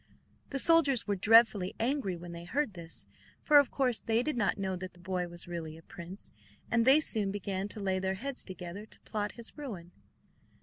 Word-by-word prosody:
The 275 - -2
soldiers 285 -4 +5
were 205 - 0
dreadfully 210 -2 +5
angry 230 -6 0
when 175 0 -9
they 170 0 -8
heard 250 +4 -1
this, 170 -2 -7 0.4
for 295 -1 +7
of 285 - +2
course 255 -4 +1
they 225 +1 +1
did 305 0 -1
not 215 -4 +1
know 190 -1 -2
that 185 0 -7
the 175 - -19
boy 180 0 -2
was 175 0 -9
really 165 -2 -5
a 165 - -15
prince; 180 +3 -10 0.4
and 230 -1 +3
they 270 +4 +7
soon 215 -9 +1
began 195 -1 -3
to 210 - -7
lay 190 -2 0
their 190 0 -1
heads 270 +6 -4
together 185 +2 -7
to - - -12
plot 210 -1 -3
his 235 -1 -5
ruin. 205 - -7
200 Hz, 205 wpm, -31 LUFS, 180-240 Hz, 0.4 s, for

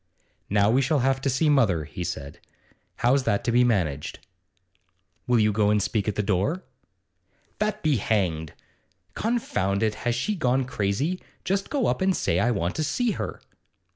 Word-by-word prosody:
'Now 100 +1 +3
we 130 +3 +3
shall 140 +1 +1
have 135 0 +1
to 135 - 0
see 135 +5 +1
mother,' 115 - +3
he 85 +4 -6
said. 70 -4 -6 0.6
'How's 130 +3 +3
that 100 - +1
to 120 - 0
be 120 +1 +4
managed?' 85 - 0 1.1
'Will 125 -1 +3
you 105 0 +3
go 105 0 +2
and 105 0 +3
speak 100 +1 -1
at 105 - -1
her 105 - +1
door?' 105 - 0 1.0
'That 215 0 -1
be 150 -4 +3
hanged! 90 -8 -1 0.6
Confound 110 - -1
it, 110 -1 +1
has 120 -1 0
she 210 - -1
gone 130 -7 +1
crazy? 125 - -1 0.2
Just 195 +2 -1
go 280 -4 0
up - - 0
and 190 -1 +2
say 85 - +1
I 115 - +2
want 90 -7 -1
to 155 - 0
see 235 - 0
her. - - -5
120 Hz, 175 wpm, -25 LUFS, 100-150 Hz, 1.1 s, be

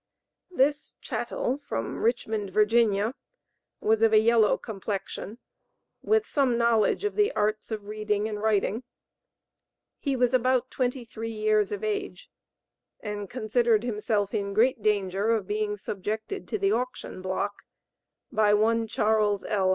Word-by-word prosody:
This 290 -4 0
"chattel" - - -2
from 115 - -4
Richmond, 220 -3 0
Virginia, 215 +1 +3 0.7
was 220 0 +2
of 225 -1 +5
a - - +8
yellow 220 -1 +4
complexion, 205 0 -5 0.6
with 440 0 +2
some 270 - +1
knowledge 235 - +2
of 415 - -1
the 415 -1 +3
arts 215 +1 -1
of 215 -2 -5
reading 210 0 -1
and 210 -1 -5
writing; 215 +1 +1 1.2
he 275 -2 -1
was 250 0 +2
about 255 0 +2
twenty 250 -1 -1
three 225 0 -6
years 215 -1 +1
of 205 0 -4
age 205 -3 -4 0.7
and 205 -2 -5
considered 230 -1 +1
himself 210 -3 -1
in 200 -2 -2
great 240 +2 +3
danger 200 0 +1
of 225 -4 +1
being 210 +1 -2
subjected 215 - -4
to - - -2
the 395 -1 +1
auction 250 - -3
block 190 +2 -3 0.7
by 210 -1 +4
one 225 +2 +2
Charles 210 -2 +1
L. 195 -3 +1
215 Hz, 135 wpm, -27 LUFS, 210-240 Hz, 1.2 s, a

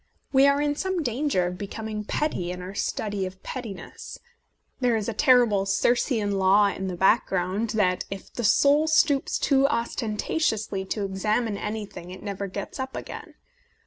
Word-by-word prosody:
We 270 +1 +6
are 280 0 +3
in 290 0 +1
some 375 +1 -1
danger 245 -6 0
of 180 0 -4
becoming 215 +1 -5
petty 195 - -1
in 180 0 -5
our 185 +2 -7
study 205 -1 -2
of 190 0 -12
pettiness; 255 - -7 0.6
there 245 -3 +2
is 215 -2 -2
a 230 - -1
terrible 230 -6 +4
Cir 200 +4 +3
cean 210 -6 0
law 200 +2 +5
in 190 -1 -4
the 185 - -3
background 190 +2 +1
that 185 -3 +1
if 195 -1 -8
the 240 - -4
soul 285 +8 +4
stoops 310 -3 +3
too 275 -1 +3
ostentatiously 220 -3 -1
to 200 +1 -2
examine 210 +3 0
any 210 +1 -4
thing 180 -3 -11
it 185 - -10
never 200 -1 -4
gets 200 +6 -6
up 260 0 -4
again. - - -8
215 Hz, 170 wpm, -25 LUFS, 195-260 Hz, 0.6 s, We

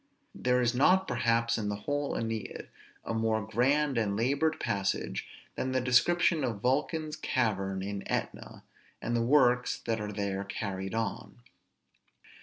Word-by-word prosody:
There 125 0 +1
is 120 0 +2
not, 185 +9 +4
perhaps, 115 -1 +1
in 105 -1 -2
the 105 - -1
whole 145 +7 -2
Æneid 115 -2 -4 0.4
a - - -2
more 110 -2 0
grand 135 +4 +2
and 100 -2 0
labored 140 +7 +1
passage 95 -11 -2 0.3
than 130 0 -2
the 130 - +2
description 150 +6 +3
of 115 -5 -2
Vulcan's 150 - 0
cavern 95 -9 -1
in 100 0 -4
Etna, - - -4 0.4
and 120 - -2
the 115 - +2
works 125 -1 +3
that 115 -2 -1
are 105 0 -4
there 100 -1 -2
carried 95 0 -4
on. 110 - -4
115 Hz, 145 wpm, -30 LUFS, 105-130 Hz, 0.4 s, not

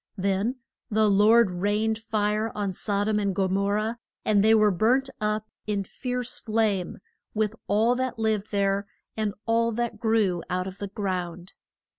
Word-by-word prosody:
Then 200 +5 0 0.3
the 215 0 +3
Lord 210 +1 +5
rained 210 +4 0
fire 215 0 0
on 200 -2 -2
Sod 205 +2 -1
om 215 -1 +2
and 200 -2 -1
Go 190 0 +2
mor 200 +2 +1
rah, 215 +2 0 0.3
and 205 -2 +4
they 220 +1 +6
were 215 -1 +5
burnt 250 +9 +2
up 215 0 0 0.2
in 205 -2 0
fierce 250 +4 -4
flame, 215 -5 0 0.4
with 215 0 +1
all 220 +4 +3
that 260 -2 -2
lived 220 -2 0
there, 200 0 0 0.3
and 215 -2 -1
all 230 0 +2
that 235 -1 -2
grew 215 -6 +2
out 185 0 -1
of 190 +1 -8
the 200 - -3
ground. 185 -3 -4
210 Hz, 165 wpm, -26 LUFS, 195-220 Hz, 0.4 s, they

